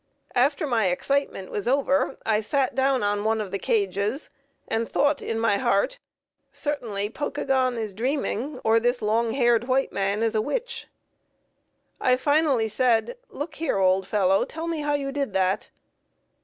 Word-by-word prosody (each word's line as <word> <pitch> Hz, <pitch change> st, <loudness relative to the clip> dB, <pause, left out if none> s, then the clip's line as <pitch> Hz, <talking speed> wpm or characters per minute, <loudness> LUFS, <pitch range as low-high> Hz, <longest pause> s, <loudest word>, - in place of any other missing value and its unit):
After 280 Hz, +5 st, +2 dB
my 230 Hz, -7 st, +1 dB
excitement 195 Hz, +1 st, -1 dB
was 205 Hz, +2 st, -3 dB
over 275 Hz, +1 st, +1 dB
I 215 Hz, -1 st, +2 dB
sat 260 Hz, +5 st, 0 dB
down 265 Hz, -2 st, +2 dB
on 205 Hz, 0 st, 0 dB
one 220 Hz, +1 st, +1 dB
of 205 Hz, -3 st, -4 dB
the 195 Hz, -, -2 dB
cages, 200 Hz, -, -1 dB, 0.4 s
and 225 Hz, 0 st, -1 dB
thought 285 Hz, 0 st, +2 dB
in 225 Hz, -, -3 dB
my 225 Hz, -3 st, +2 dB
heart, -, -, +1 dB, 0.5 s
"Certainly 220 Hz, -9 st, -3 dB
Pokagon 260 Hz, -2 st, 0 dB
is 215 Hz, -3 st, -3 dB
dreaming, 260 Hz, +3 st, -2 dB
or 225 Hz, +1 st, +4 dB
this 245 Hz, 0 st, 0 dB
long 225 Hz, +2 st, +1 dB
haired 240 Hz, -3 st, +3 dB
white 265 Hz, +1 st, +1 dB
man 200 Hz, +2 st, 0 dB
is 225 Hz, -, +1 dB
a 215 Hz, -, +2 dB
witch." 470 Hz, -, -3 dB, 1.1 s
I 255 Hz, 0 st, +3 dB
finally 285 Hz, -4 st, +2 dB
said, 245 Hz, -, +1 dB
"Look 305 Hz, +2 st, -6 dB
here, 325 Hz, -, 0 dB
old 190 Hz, 0 st, +2 dB
fellow, 195 Hz, -2 st, +2 dB
tell 325 Hz, +1 st, -6 dB
me 330 Hz, -2 st, -2 dB
how 295 Hz, 0 st, 0 dB
you 275 Hz, -1 st, -2 dB
did 275 Hz, -6 st, -2 dB
that." 190 Hz, 0 st, 0 dB
240 Hz, 160 wpm, -25 LUFS, 210-280 Hz, 1.1 s, or